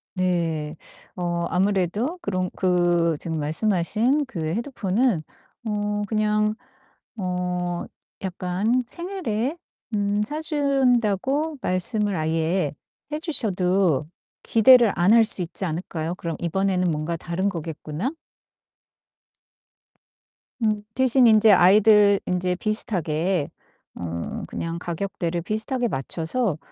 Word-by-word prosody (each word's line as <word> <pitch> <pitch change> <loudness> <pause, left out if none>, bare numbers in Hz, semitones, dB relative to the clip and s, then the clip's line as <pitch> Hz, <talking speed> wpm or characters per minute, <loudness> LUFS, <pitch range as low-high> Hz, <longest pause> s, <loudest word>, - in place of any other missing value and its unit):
네. 165 -4 -1 0.4
어 175 -1 -2
아무래도 200 - 0
그런 185 -2 -2
그 175 -3 +2
지금 160 -2 -1
말씀하신 215 - +1
그 175 -11 -5
헤드폰은 225 - 0 0.5
어 205 0 -2
그냥 215 -1 +1 0.6
어 180 -2 -3 0.4
약간 190 +7 -1
생일에 335 - -3 0.4
음 205 0 0
사 300 +8 -3
준다고 275 - +1
말씀을 200 +3 0
아예 160 0 0 0.4
해 300 - -2
주셔도 185 - +1 0.4
기대를 235 -1 +6
안 180 +5 +3
할 230 -1 +6
수 195 -4 +6
있지 175 +3 -2
않을까요? 165 0 -3
그럼 165 -3 -5
'이번에는 185 +1 0
뭔가 155 +3 -3
다른 175 +4 -2
거겠구나.' 165 - -5 2.5
음 210 -1 0
대신 260 -1 +5
인제 215 -1 +6
아이들 200 +2 +6
인제 180 0 0
비슷하게 180 - 0 0.5
어 85 -1 -5
그냥 165 0 -4
가격대를 175 -1 -3
비슷하게 220 +6 -1
맞춰서 165 - -1
190 Hz, 220 characters per minute, -23 LUFS, 170-220 Hz, 2.5 s, 기대를